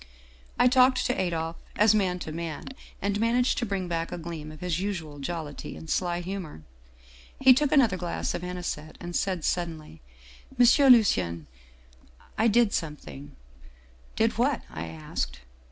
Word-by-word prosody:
" 60 0 -27 0.2
I 250 - +6
talked 255 0 +4
to 250 - +1
Adolphe 165 -2 -3
as 210 +1 +5
man 190 -4 +1
to 155 - -5
man, 165 -1 -5 0.3
and 200 +1 0
managed 240 +4 +2
to 240 - -2
bring 195 -2 -2
back 165 -1 -2
a - - -4
gleam 160 -2 -7
of 155 - -12
his 180 -1 -2
usual 170 -7 -4
jollity 150 0 -5
and 160 - -10
sly 175 +1 -1
humor. 175 - -6 0.8
He 265 -1 +8
took 285 +2 +1
another 235 -10 +4
glass 175 -1 -3
of - - -4
anisette, 180 -4 -5
and 175 0 -6
said 185 -4 -1
suddenly: 160 - -3 0.2
" 60 +1 -21
' 270 - -22
M. 260 +3 +7
Lucien 85 - 0 0.9
I 220 - +3
did 230 -1 +3
something 75 - -5 0.4
' - - -28
"'Did 225 0 +1
what?' 260 +1 +1
I 80 +1 -5
asked. 65 -6 -5
175 Hz, 170 wpm, -27 LUFS, 150-215 Hz, 0.9 s, He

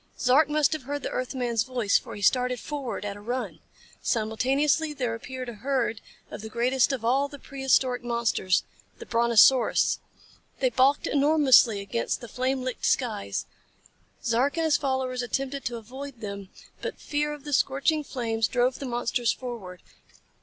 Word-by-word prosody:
Zark 280 +4 +4
must 300 -1 +2
have 310 - -3
heard 290 -1 -3
the - - -3
earth 255 +1 -3
man's 240 -3 0
voice, 240 -3 +1
for - - -10
he 205 - -7
started 250 +3 +2
forward 275 -8 -5
at 200 0 -4
a - - -12
run. 245 +4 -4 0.4
Simultaneously 270 +7 +1
there 250 -5 -2
appeared 255 +2 -6
a 240 - -5
herd 230 -1 -1 0.3
of - - -7
the 220 - -7
greatest 250 +4 +2
of 250 -4 -3
all 270 +4 +2
the 285 - -10
prehistoric 265 -3 0
monsters 235 -6 +1 0.3
the - - -9
Brontosaurus. 235 +2 +4 0.6
They 255 -2 +2
balked 265 +4 +3
enormously 280 -7 +4
against 215 +4 -2
the 240 - -9
flame 255 +2 -1
licked 255 -1 -2
skies. 215 - -1 0.8
Zark 250 +7 +1
and 325 - +1
his 315 - +3
followers 260 -2 -1
attempted 270 +3 -3
to 240 0 -2
avoid 255 +3 -9
them. 200 -2 -6 0.3
But - - -4
fear 295 0 -1
of 295 -2 -8
the 295 -1 -5
scorching 275 +4 +2
flames 225 -4 -1
drove 250 +1 +1
the 275 - -5
monsters 240 -1 0
forward. 225 -8 -7
255 Hz, 165 wpm, -26 LUFS, 230-275 Hz, 0.8 s, Zark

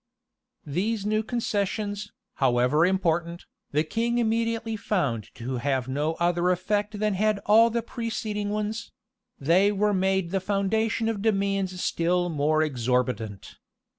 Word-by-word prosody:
[] - - -60 0.2
These 195 +8 -1
new 215 +1 +1
concessions, 210 -2 -2 0.3
however 130 +5 +3
important, 175 -2 0 0.3
the 150 +2 +2
king 230 +8 -1
immediately 230 -1 0
found 145 - -1
to 125 +2 -4
have 130 0 -1
no 145 +4 -1
other 175 +1 +1
effect 205 +3 0
than 210 0 +1
had 210 +2 +1
all 225 +3 +6
the 230 0 -1
preceding 220 -3 -3
ones: 215 +1 -3 0.5
they 180 +8 +4
were 210 +1 +1
made 190 -2 +1
the 195 - +1
foundation 210 +4 0
of 220 -3 -1
demands 195 -3 0
still 175 +1 +1
more 155 0 +2
exorbitant. 125 -6 -2
195 Hz, 135 wpm, -26 LUFS, 155-215 Hz, 0.5 s, all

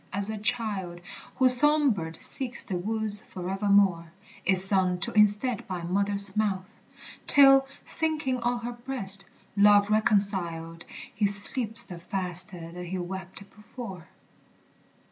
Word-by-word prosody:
As 200 +2 -3
a 220 - -5
child 205 -6 -1 0.4
Whose 255 -1 +6
song 295 0 +4
bird 165 -5 -6
seeks 255 -2 -4
the 190 - -5
woods 215 +2 -1
forevermore, 190 -2 0 0.3
Is 190 0 +2
sung 190 -2 +1
to - - -2
instead 210 +3 +1
by 180 -3 -6
mother's 200 +2 0
mouth; 195 -3 -1 0.6
Till, 270 -1 +5 0.2
sinking 310 -5 -1
on 240 0 -2
her 240 - -4
breast, 235 -6 -3 0.3
love 205 0 +4
reconciled, 190 -6 -1 0.3
He 210 0 0
sleeps 220 +3 +4
the 180 -6 -9
faster 180 -2 -4
that 180 +1 -8
he 185 +2 -4
wept 190 +2 -8
before. 210 -4 -10
200 Hz, 125 wpm, -26 LUFS, 185-230 Hz, 0.6 s, Whose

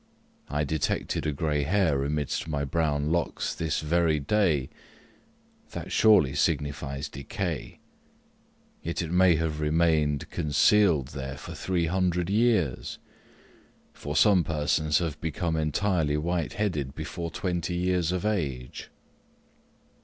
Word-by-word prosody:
I 75 +1 0
detected 75 +1 -1
a - - +1
gray 75 0 -1
hair 80 -3 +1
amidst 75 +2 -2
my 70 -2 -2
brown 75 0 0
locks 85 -4 -1
this 80 -3 -2
very 80 0 +2
day 80 -4 +1 1.0
that - - -6
surely 90 -12 +5
signifies 70 -2 -1
decay. 80 +4 -5 1.0
Yet 85 +1 -3
it 80 - -5
may 90 -1 +5
have 80 -1 -2
remained 75 -2 +2
concealed 75 -1 +3
there 65 -1 -6
for - - -8
three 90 -3 -1
hundred 90 +1 0
years 105 - +1 1.0
for 75 0 -6
some 100 -3 +5
persons 75 0 +1
have 80 -4 -3
become 80 +1 -2
entirely 80 0 0
white 85 +1 -1
headed 75 -10 -2
before 85 +2 -5
twenty 90 0 -2
years 90 -1 +1
of 90 +2 -2
age. 70 -12 -3
80 Hz, 120 wpm, -27 LUFS, 75-90 Hz, 1.0 s, surely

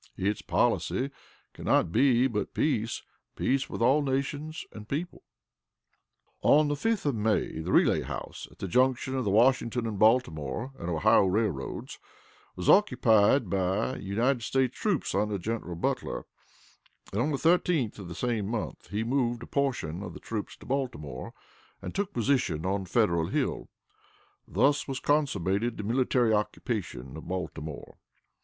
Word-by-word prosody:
Its 100 +2 -1
policy 135 +2 0 0.4
can - - -10
not - - +3
but - - -11
be 130 -2 +4 0.3
peace 115 -7 0 0.3
peace 135 +1 0
with - - -2
all 135 +5 +4
nations 145 +3 -2
and 105 0 -11
people." 165 +5 -4 1.2
On 150 0 +5
the - - +1
5th 220 +7 -1
of 145 - +2
May, 105 -6 0
the 85 +3 -3
Relay - - +4
House, - - -6
at - - -20
the 95 - -4
junction 130 +4 +2
of 130 -1 0
the - - +1
Washington 120 +2 +3
and 105 -3 -3
Baltimore 110 - +2
and 85 - -4
Ohio 80 +3 +4
Railroads, 95 -8 -2 0.6
was 90 - -5
occupied 120 - +5
by 95 +6 0
United 115 +6 0
States 130 +2 0
troops 200 -8 -1
under 105 +1 0
General 100 -2 -4
Butler, 85 - -2 0.9
and, 105 - +1
on 145 - +1
the 145 - 0
13th 165 -8 +2
of 95 - -7
the 85 - -7
same 110 0 -1
month, 105 - -4
he 105 +2 -2
moved 120 -1 0
a - - -7
portion 120 - -1
of 95 -4 -7
the - - -8
troops 110 -2 -5
to - - -15
Baltimore, 75 - -3 0.5
and - - -7
took 200 0 -2
position 115 - 0
on 95 0 -1
Federal 85 -5 +2
Hill - - -2 0.8
thus 140 +8 +2
was 135 -1 -3
consummated 120 - 0
the 105 - -4
military 120 0 +2
occupation 105 - -3
of 80 - -9
Baltimore. 80 -5 -6
115 Hz, 150 wpm, -28 LUFS, 95-135 Hz, 1.2 s, On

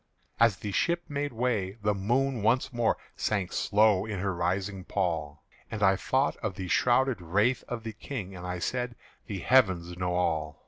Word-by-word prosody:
As 115 -4 +5
the 105 - -5
ship 170 - +1
made 145 0 -2
way, 115 -5 -1
the 105 0 +2
moon 120 +5 0
once 120 +5 +2
more 120 -1 +1 0.2
Sank 100 -4 -1
slow 105 -2 +3
in 105 -2 -4
her 95 +1 -1
rising 95 +2 -2
pall; 80 -7 -2 0.3
And 105 -2 -3
I 95 -1 +5
thought 130 +8 0
of 105 -5 -4
the 95 -1 -5
shrouded 125 +2 +2
wraith 105 +9 +1
of 120 -2 -5
the 110 -1 -5
King, 105 -4 -6
And 90 - -8
I 90 0 -3
said, 125 +6 -2 0.3
"The 100 - -4
Heavens 95 -9 +3
know 90 -1 0
all." 80 -4 -1
105 Hz, 180 wpm, -28 LUFS, 90-120 Hz, 0.3 s, As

